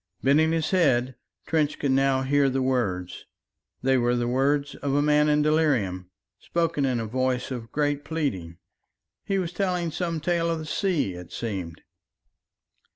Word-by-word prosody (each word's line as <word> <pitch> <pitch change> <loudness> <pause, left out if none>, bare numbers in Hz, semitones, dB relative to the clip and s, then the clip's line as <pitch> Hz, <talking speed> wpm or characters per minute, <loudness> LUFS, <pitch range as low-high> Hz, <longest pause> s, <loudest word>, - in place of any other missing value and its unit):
Bending 155 +4 +4
his 160 -1 0
head, 130 -9 +2 0.3
Trench 155 -2 0
could 140 - 0
now 135 0 +2
hear 140 +1 +3
the 130 0 -1
words. 105 -9 -2 0.6
They 130 0 +3
were 120 0 +2
the 120 0 -1
words 140 +3 +1
of 140 -1 -2
a 145 - +3
man 150 0 +3
in 150 0 +3
delirium, 125 - +1 0.3
spoken 165 -4 -1
in 125 -3 0
a 115 - -3
voice 130 +3 -1
of 120 -3 -6
great 145 -1 0
pleading. 95 - -3 0.7
He 195 - 0
was 180 -2 -2
telling 180 -4 -1
some 170 0 -2
tale 170 +1 0
of 165 - 0
the 155 - -6
sea, 160 - 0
it 90 -1 -10
seemed. 95 -8 -5
140 Hz, 160 wpm, -25 LUFS, 125-160 Hz, 0.7 s, Bending